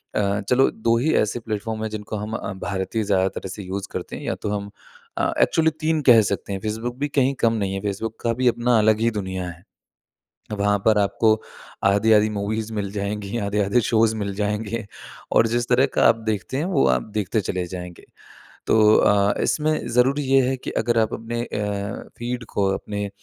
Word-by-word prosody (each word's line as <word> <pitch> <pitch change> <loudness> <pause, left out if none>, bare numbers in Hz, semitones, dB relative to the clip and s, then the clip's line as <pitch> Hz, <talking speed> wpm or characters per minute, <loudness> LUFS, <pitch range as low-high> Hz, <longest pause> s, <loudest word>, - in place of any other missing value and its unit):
अ, 100 0 +1
चलो 130 +1 +4
2 115 +1 +1
ही 155 +7 +1
ऐसे 110 +3 +1
प्लेटफ़ॉर्म 110 0 -4
हैं 110 - -2
जिनको 110 0 -6
हम 105 +1 -4
अ, - - -4
भारतीय 105 +3 -2
ज़्यादा 95 -2 +2
तरह 95 - -7
से 100 +2 -7
यूज़ 95 +1 -5
करते - - -5
हैं - - -8
या - - -2
तो 105 - -5
हम 100 -1 -3 0.5
अ, 325 0 +1
एक्चुअली 160 - +3
3 160 -1 +1
कह 115 -2 +8
सकते 100 +1 -3
हैं। 95 - -3
फ़ेसबुक 110 +3 -3
भी 145 - 0
कहीं 140 -2 +1
कम 115 -1 +3
नहीं 100 -3 -1
है। 95 - -3
फ़ेसबुक 105 +2 -4
का 115 - +1
भी 130 - +3
अपना 120 0 +3
अलग 110 0 +3
ही 115 - +2
दुनिया 95 -3 -4
है। 85 0 -12 1.0
वहाँ 105 0 +2
पर 110 -1 +4
आपको 110 +2 +3 0.5
आधी-आधी 105 +2 +4
मूवीज़ 105 +2 -3
मिल 100 -2 -2
जाएँगी, 100 +1 -3
आधे-आधे 100 +1 +1
शोज़ 110 -1 +2
मिल 100 -2 -3
जाएँगे 105 +1 -2 0.5
और - - +5
जिस 120 +1 -1
तरह 130 +2 +4
का - - +3
आप - - +5
देखते 105 +4 -3
हैं, 145 - 0
वो 175 -6 +2
आप 65 -1 +2
देखते 105 +1 0
चले 90 -2 -3
जाएँगे। 90 -1 -8 0.6
तो 110 -1 +5
अ, 100 0 +3
इसमें 155 0 +1 0.2
ज़रूरी 135 +4 +3
ये 135 0 +4
है 135 - 0
कि - - -6
अगर 120 +1 +1
आप 110 0 +1
अपने 115 +1 -4
अ, - - -5 0.6
फ़ीड 120 +1 -3
को, 100 -1 +2
अपने 100 0 -4
110 Hz, 200 wpm, -23 LUFS, 100-120 Hz, 1.0 s, कह